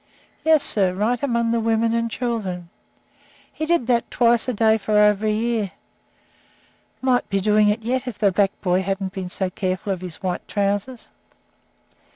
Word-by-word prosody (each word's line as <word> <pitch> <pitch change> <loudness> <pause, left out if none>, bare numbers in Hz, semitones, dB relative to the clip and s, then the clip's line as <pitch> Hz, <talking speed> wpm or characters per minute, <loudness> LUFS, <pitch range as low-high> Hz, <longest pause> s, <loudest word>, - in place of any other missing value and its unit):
"Yes, 315 -2 +4
sir, 190 -4 +1
right 225 +5 0
among 235 -4 0
the 235 - +1
women 225 0 +1
and 230 0 0
children. 210 -8 -3 0.8
He 315 - -4
did 340 -7 +2
that 235 -1 +1
twice 235 -1 +2
a 255 - 0
day 220 +1 +3
for 210 +1 0
over 210 0 +4
a - - +2
year. 220 -2 -1 1.3
Might 255 -1 +1
be 195 - +1
doing 210 +1 +3
it 210 +2 0
yet 255 +3 -1
if 245 - -5
the 205 -2 +3
black 195 +1 +1
boy 180 -1 +1
hadn't 195 0 -3
been 190 -2 -5
so 185 0 -2
careful 185 +2 -2
of 185 - -7
his 180 -3 -6
white 180 -1 -3
trousers." 205 +4 -2
215 Hz, 175 wpm, -22 LUFS, 195-235 Hz, 1.3 s, Yes